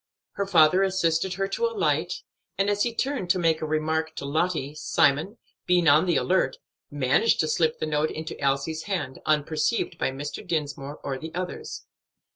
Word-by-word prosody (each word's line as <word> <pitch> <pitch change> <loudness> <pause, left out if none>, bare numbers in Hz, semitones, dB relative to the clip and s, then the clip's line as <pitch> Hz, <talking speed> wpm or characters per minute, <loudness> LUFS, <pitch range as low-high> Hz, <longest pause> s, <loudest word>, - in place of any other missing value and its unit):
Her 200 - -3
father 175 0 +5
assisted 185 -1 +1
her 195 +1 -1
to 470 - 0
alight, 465 -3 -1 0.3
and 195 +1 +2
as 205 0 0
he 240 - +2
turned 255 -5 -2
to 180 - +3
make 165 -3 +1
a 155 - -2
remark 160 +1 -1
to - - -5
Lottie, 155 -1 -1
Simon, 155 - +1 0.3
being 180 -2 +3
on 155 +5 +5
the 175 - +2
alert, 180 -8 +1 0.3
managed 145 - +2
to 155 - 0
slip 155 0 +1
the - - -2
note 155 0 0
into 155 -1 -6
Elsie's 140 +3 0
hand, 150 -10 -3
unperceived 155 +8 0
by - - +1
Mr. 140 +2 -6
Dinsmore, 145 -2 -3
or 135 -1 -3
the 160 +2 -7
others. 180 0 -5
160 Hz, 175 wpm, -26 LUFS, 150-185 Hz, 0.3 s, father